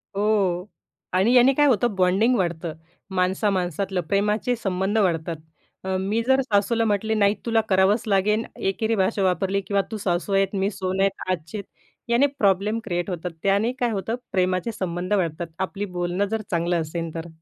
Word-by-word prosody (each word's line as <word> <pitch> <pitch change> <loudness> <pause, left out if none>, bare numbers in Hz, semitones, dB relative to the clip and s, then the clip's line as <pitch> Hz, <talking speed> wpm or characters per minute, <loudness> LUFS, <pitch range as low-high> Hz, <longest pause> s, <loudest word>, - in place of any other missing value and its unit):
हो. 200 -3 +1 0.4
आणि 190 +6 +3
याने 255 +2 +6
काय 295 +2 +3
होतं 240 -4 +2
बॉन्डिंग 190 +7 +3
वाढतं. 170 -4 -2 0.4
माणसा-माणसातलं 185 0 0
प्रेमाचे 210 +7 0
संबंध 195 -1 -1
वाढतात. 170 -4 +1 0.5
अ, 190 0 -1
मी 210 +4 0
जर 265 0 +4
सासूला 230 -1 +1
म्हटले, 215 +1 0
"नाही 205 -1 +3
तुला 225 -1 +3
करावंच 195 +4 +3
लागेल" 210 +2 +2
एकेरी 220 +4 -1
भाषा 195 0 +1
वापरली 190 +2 +1
किंवा 200 +1 0
तू 220 - -3
सासू 185 0 -1
आहेत, 195 +1 +2
मी 195 +1 +1
सून 190 -1 -3
आहेत 195 0 0
आजचे 180 +4 -4 0.5
याने 240 +4 +4
प्रॉब्लेम 200 +2 +2
क्रिएट 175 -4 -2
होतात. 180 0 -4
त्याने 200 +4 +2
काय 245 - +1
होतात, 220 +3 -2
प्रेमाचे 185 +4 0
संबंध 180 0 -3
वाढतात, 170 -3 -1
आपली 195 +2 -2
बोलणं 175 +3 0
जर 220 -1 -1
चांगलं 170 0 +1
असेन 165 +1 -4
तर. 165 0 -5
195 Hz, 160 wpm, -24 LUFS, 180-215 Hz, 0.5 s, याने